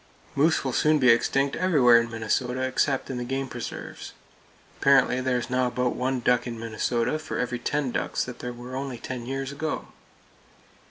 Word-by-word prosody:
Moose 155 Hz, +4 st, +2 dB
will 130 Hz, -, -1 dB
soon 155 Hz, +4 st, +3 dB
be 130 Hz, -3 st, +4 dB
extinct 135 Hz, +4 st, +2 dB
everywhere 130 Hz, -11 st, +5 dB
in 115 Hz, -, -5 dB
Minnesota 125 Hz, +3 st, -1 dB
except 130 Hz, +1 st, 0 dB
in 125 Hz, -, -3 dB
the -, -, -3 dB
game 135 Hz, +2 st, -2 dB
preserves. 120 Hz, -2 st, -7 dB, 0.7 s
Apparently 135 Hz, -2 st, +4 dB
there 130 Hz, -1 st, +1 dB
is 120 Hz, -, -3 dB
now 125 Hz, 0 st, +1 dB
about 125 Hz, 0 st, -1 dB
one 130 Hz, 0 st, -1 dB
duck 125 Hz, +1 st, +2 dB
in 115 Hz, -1 st, -5 dB
Minnesota 115 Hz, +5 st, -1 dB
for 155 Hz, -, -5 dB
every 125 Hz, -1 st, -2 dB
ten 145 Hz, 0 st, -1 dB
ducks -, -, -1 dB
that 125 Hz, -, -8 dB
were 120 Hz, 0 st, -6 dB
there 130 Hz, -, -6 dB
only 135 Hz, -2 st, -4 dB
ten 120 Hz, 0 st, -6 dB
years 135 Hz, +1 st, -3 dB
ago. 155 Hz, +2 st, -4 dB
125 Hz, 180 wpm, -26 LUFS, 120-135 Hz, 0.7 s, everywhere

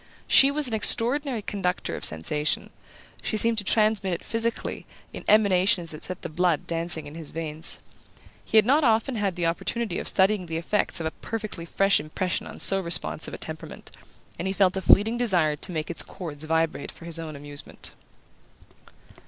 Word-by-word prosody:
She 270 Hz, -, +7 dB
was 290 Hz, 0 st, +1 dB
an 235 Hz, -, -2 dB
extraordinary 240 Hz, +3 st, +1 dB
conductor 190 Hz, -3 st, -2 dB
of -, -, -5 dB
sensation: 150 Hz, -, -1 dB, 0.5 s
she 215 Hz, -, -2 dB
seemed 230 Hz, +1 st, +2 dB
to -, -, -5 dB
transmit 210 Hz, -2 st, +3 dB
it 170 Hz, -, -4 dB
physically, 230 Hz, 0 st, -2 dB, 0.3 s
in -, -, -7 dB
emanations 195 Hz, -4 st, +3 dB
that 155 Hz, -, -9 dB
set 185 Hz, -, -7 dB
the -, -, -3 dB
blood 170 Hz, 0 st, +1 dB
dancing 165 Hz, -1 st, -2 dB
in 145 Hz, -, -9 dB
his 160 Hz, -2 st, -7 dB
veins. 160 Hz, -1 st, -2 dB, 0.7 s
He 220 Hz, -, +1 dB
had 215 Hz, -, +7 dB
not 285 Hz, +6 st, +4 dB
often 230 Hz, +1 st, +2 dB
had 200 Hz, -4 st, -1 dB
the 175 Hz, -2 st, -1 dB
opportunity 180 Hz, +4 st, -1 dB
of -, -, -5 dB
studying 190 Hz, -1 st, +3 dB
the 160 Hz, 0 st, -3 dB
effects 185 Hz, +4 st, 0 dB
of -, -, -3 dB
a 160 Hz, -, -1 dB
perfectly 215 Hz, -6 st, -6 dB
fresh 195 Hz, +3 st, +3 dB
impression 175 Hz, +4 st, -3 dB
on -, -, -10 dB
so 195 Hz, -, +4 dB
responsive 170 Hz, -2 st, -1 dB
a -, -, -7 dB
temperament, -, -, -6 dB, 0.5 s
and 180 Hz, -, -2 dB
he 190 Hz, -, -2 dB
felt 190 Hz, -2 st, +3 dB
a 190 Hz, -, -2 dB
fleeting 220 Hz, +5 st, +5 dB
desire 180 Hz, -11 st, +2 dB
to 170 Hz, -, -5 dB
make 155 Hz, -1 st, -3 dB
its 170 Hz, -, -1 dB
chords 155 Hz, -4 st, -6 dB
vibrate 160 Hz, -1 st, 0 dB
for 170 Hz, -, -13 dB
his 170 Hz, -1 st, -3 dB
own 160 Hz, -2 st, -6 dB
amusement. 145 Hz, 0 st, -5 dB
185 Hz, 185 wpm, -26 LUFS, 165-220 Hz, 0.7 s, She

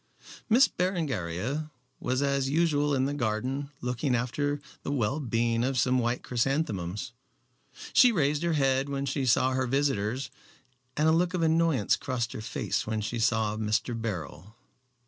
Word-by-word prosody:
Miss 245 Hz, +5 st, +6 dB
Berengaria 145 Hz, -, -2 dB, 0.3 s
was 130 Hz, +2 st, 0 dB
as 140 Hz, -1 st, +1 dB
usual 145 Hz, -2 st, +2 dB
in 130 Hz, 0 st, +1 dB
the 140 Hz, -, -1 dB
garden 130 Hz, +3 st, -2 dB
looking 125 Hz, +2 st, 0 dB
after 145 Hz, +4 st, -1 dB, 0.2 s
the -, -, -4 dB
well 135 Hz, +1 st, 0 dB
being 115 Hz, -3 st, 0 dB
of 130 Hz, +1 st, 0 dB
some 130 Hz, 0 st, +3 dB
white 120 Hz, +1 st, -1 dB
chrysanthemums. 115 Hz, -, -1 dB, 0.8 s
She 250 Hz, -, +7 dB
raised 150 Hz, -6 st, +1 dB
her 170 Hz, -1 st, +1 dB
head 135 Hz, -1 st, +1 dB
when 140 Hz, 0 st, -2 dB
she 135 Hz, 0 st, -1 dB
saw 130 Hz, +2 st, +3 dB
her 130 Hz, 0 st, 0 dB
visitors, 130 Hz, -2 st, 0 dB, 0.7 s
and 150 Hz, +1 st, +3 dB
a -, -, +5 dB
look 175 Hz, +3 st, +2 dB
of 170 Hz, -, 0 dB
annoyance 160 Hz, -7 st, +2 dB
crossed 120 Hz, -4 st, -2 dB
her -, -, -6 dB
face 110 Hz, -, -2 dB
when 110 Hz, -1 st, -1 dB
she 115 Hz, +3 st, -3 dB
saw 110 Hz, -2 st, +1 dB
Mr. 110 Hz, +3 st, 0 dB
Beryl. 105 Hz, -2 st, -5 dB
130 Hz, 155 wpm, -28 LUFS, 115-145 Hz, 0.8 s, She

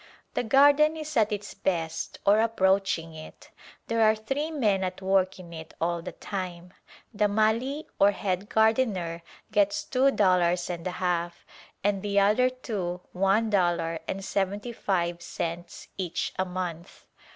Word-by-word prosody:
The -, -, 0 dB
garden 285 Hz, +6 st, +5 dB
is 305 Hz, -1 st, -6 dB
at 215 Hz, -2 st, +3 dB
its 205 Hz, -1 st, -4 dB
best 165 Hz, -4 st, -2 dB
or 205 Hz, +2 st, +5 dB
approaching 190 Hz, -6 st, +1 dB
it. 155 Hz, 0 st, -12 dB, 0.3 s
There 230 Hz, 0 st, 0 dB
are 220 Hz, 0 st, +5 dB
three 270 Hz, +8 st, -3 dB
men 215 Hz, -11 st, +1 dB
at 185 Hz, 0 st, -3 dB
work 190 Hz, -1 st, +1 dB
in 175 Hz, -2 st, -11 dB
it 160 Hz, -1 st, -9 dB
all 170 Hz, 0 st, -1 dB
the -, -, -6 dB
time. 180 Hz, -2 st, -6 dB, 0.4 s
The 210 Hz, 0 st, +2 dB
Mali 225 Hz, +8 st, +1 dB
ox 200 Hz, 0 st, +4 dB
head 190 Hz, +1 st, -2 dB
gardener 220 Hz, -7 st, +1 dB, 0.3 s
gets 205 Hz, -1 st, +2 dB
two 265 Hz, +1 st, +2 dB
dollars 180 Hz, -6 st, +2 dB
and 170 Hz, 0 st, -5 dB
a 180 Hz, -, -4 dB
half, 175 Hz, -1 st, -2 dB, 0.4 s
and 200 Hz, -1 st, +1 dB
the 200 Hz, 0 st, +1 dB
other 215 Hz, +6 st, +4 dB
two 200 Hz, -9 st, -4 dB
one 195 Hz, +4 st, +2 dB
dollar 175 Hz, -4 st, +1 dB
and 195 Hz, 0 st, -4 dB
seventy 200 Hz, +5 st, -2 dB
five 175 Hz, -5 st, -1 dB
cents 170 Hz, +1 st, -5 dB
each 180 Hz, -3 st, -2 dB
a 185 Hz, -, +2 dB
month. 180 Hz, -2 st, -6 dB
195 Hz, 150 wpm, -27 LUFS, 175-220 Hz, 0.4 s, garden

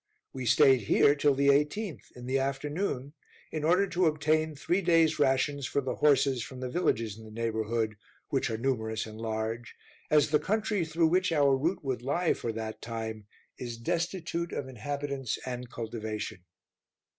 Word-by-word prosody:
We 130 Hz, -2 st, -4 dB
stayed 135 Hz, 0 st, +6 dB
here 140 Hz, -, +6 dB
till 145 Hz, -1 st, +2 dB
the 140 Hz, +1 st, +3 dB
18th, 150 Hz, -, +1 dB
in 125 Hz, 0 st, -9 dB
the 130 Hz, +2 st, +1 dB
afternoon, 140 Hz, +1 st, -2 dB, 0.4 s
in 155 Hz, -1 st, -3 dB
order 180 Hz, +5 st, +4 dB
to 180 Hz, -1 st, +2 dB
obtain 155 Hz, 0 st, +1 dB
three 175 Hz, +7 st, 0 dB
days 165 Hz, -3 st, +3 dB
rations 140 Hz, 0 st, +2 dB
for -, -, 0 dB
the 130 Hz, -2 st, -3 dB
horses 135 Hz, -3 st, +3 dB
from 130 Hz, +3 st, -7 dB
the 125 Hz, -1 st, -4 dB
villages 115 Hz, -, 0 dB
in -, -, -11 dB
the 110 Hz, -, -11 dB
neighborhood, 110 Hz, -1 st, -1 dB, 0.3 s
which -, -, 0 dB
are 110 Hz, -, -2 dB
numerous 110 Hz, -3 st, -1 dB
and 110 Hz, 0 st, -10 dB
large, 110 Hz, +1 st, -3 dB, 0.3 s
as 150 Hz, -1 st, +4 dB
the 150 Hz, -, +4 dB
country 210 Hz, -3 st, 0 dB
through 160 Hz, 0 st, +2 dB
which 185 Hz, +1 st, +2 dB
our 140 Hz, -4 st, +4 dB
route 160 Hz, +8 st, -1 dB
would 130 Hz, -3 st, -2 dB
lie 160 Hz, +7 st, +1 dB
for 115 Hz, -, -3 dB
that 110 Hz, 0 st, -5 dB
time, 110 Hz, -2 st, -5 dB, 0.3 s
is 120 Hz, -2 st, -5 dB
destitute 170 Hz, +4 st, -2 dB
of 135 Hz, -, -3 dB
inhabitants 140 Hz, +1 st, -3 dB
and 125 Hz, -1 st, -5 dB
cultivation. 110 Hz, -5 st, -5 dB
135 Hz, 170 wpm, -29 LUFS, 115-155 Hz, 0.4 s, stayed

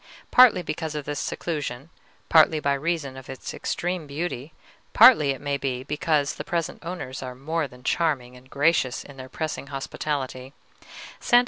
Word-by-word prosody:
Partly 235 Hz, -8 st, +7 dB
because 155 Hz, -1 st, -4 dB
of 150 Hz, -2 st, -4 dB
this 145 Hz, -1 st, -3 dB
seclusion, 150 Hz, -3 st, -4 dB, 0.4 s
partly 160 Hz, -1 st, +5 dB
by 140 Hz, -1 st, +1 dB
reason 145 Hz, -2 st, -2 dB
of 130 Hz, -1 st, -11 dB
its 130 Hz, -1 st, -6 dB
extreme 175 Hz, -3 st, -3 dB
beauty, 145 Hz, -1 st, -4 dB, 0.4 s
partly, 225 Hz, -, +8 dB
it 135 Hz, -, -1 dB
may 145 Hz, -1 st, -1 dB
be, 130 Hz, -2 st, -3 dB
because 150 Hz, 0 st, 0 dB
the -, -, -6 dB
present 170 Hz, 0 st, -3 dB
owners 165 Hz, -7 st, -6 dB
are 125 Hz, -1 st, -6 dB
more 155 Hz, +4 st, -2 dB
than 125 Hz, -1 st, -16 dB
charming 135 Hz, -6 st, 0 dB
and 125 Hz, +1 st, -16 dB
gracious 140 Hz, -3 st, +1 dB
in 140 Hz, -, -13 dB
their 130 Hz, 0 st, -9 dB
pressing 155 Hz, -2 st, -4 dB
hospitality, 135 Hz, -1 st, -4 dB, 0.7 s
Sta. 240 Hz, -, +5 dB
145 Hz, 160 wpm, -25 LUFS, 130-165 Hz, 0.7 s, partly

